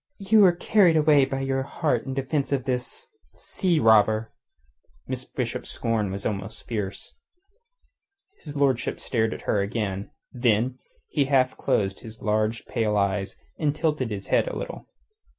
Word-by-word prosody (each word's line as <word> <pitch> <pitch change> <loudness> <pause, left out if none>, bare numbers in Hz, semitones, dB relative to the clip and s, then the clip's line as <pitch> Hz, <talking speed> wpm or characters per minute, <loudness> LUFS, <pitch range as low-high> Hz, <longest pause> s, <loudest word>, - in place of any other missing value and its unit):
"You 215 +2 +3
were 185 -3 +7
carried 175 -3 +4
away 150 -3 +5
by 135 0 -3
your 135 0 0
heat 135 -2 -1
in 135 - -3
defence 135 +1 -1
of 135 -2 0
this... 125 -2 -3 0.3
sea 175 -4 0
robber." 110 0 +4 0.7
Miss 130 -1 -4
Bishop's 125 -2 -4
scorn 115 -4 -1
was 100 +1 -5
almost 105 +1 -4
fierce. 105 -4 -5 1.2
His 145 -1 -8
lordship 135 -4 +1
stared 110 -2 0
at - - -6
her 100 - +1
again. 100 -1 -3 0.2
Then 125 +1 +1 0.3
he 145 - +1
half 130 -2 +2
closed 95 -1 0
his 110 -1 -11
large, 110 +1 0
pale 105 -2 0
eyes, 100 0 0 0.2
and 150 -2 +1
tilted 150 -6 0
his 100 -2 -5
head - - +2
a - - -4
little. - - -7
125 Hz, 150 wpm, -25 LUFS, 110-140 Hz, 1.2 s, were